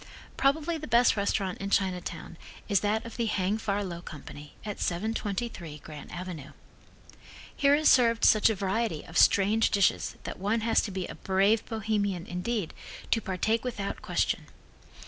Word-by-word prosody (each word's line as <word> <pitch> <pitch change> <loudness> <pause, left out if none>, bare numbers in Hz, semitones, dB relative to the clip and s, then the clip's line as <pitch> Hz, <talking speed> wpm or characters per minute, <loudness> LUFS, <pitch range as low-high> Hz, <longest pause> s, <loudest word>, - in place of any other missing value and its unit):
Probably 315 +4 +1
the 305 - -7
best 235 +2 +4
restaurant 200 -2 -1
in 195 - -4
Chinatown 185 -3 -1 0.3
is 200 -3 +3
that 215 +2 0
of 230 - -8
the 235 -2 0
Hang 205 0 0
Far 205 -1 -1
Low 170 -3 -5
Company, 150 -2 -10
at 210 -1 -5
723 195 -3 -3
Grant 150 0 -11
avenue. 175 -5 -7 1.0
Here 280 0 +4
is 310 +1 +2
served 230 -3 +5
such 215 +1 +6
a 220 - 0
variety 195 -3 -1
of 165 - -12
strange 205 +5 +4
dishes 200 -3 +1
that - - -6
one 210 +4 0
has 225 +1 +3
to - - -4
be 185 -1 -3
a - - -7
brave 195 +3 +2
Bohemian, 205 -5 -1
indeed, 180 +1 -3 0.4
to 225 - +3
partake 215 +4 0
without 210 -6 -4
question. - - -1
205 Hz, 160 wpm, -28 LUFS, 185-225 Hz, 1.0 s, such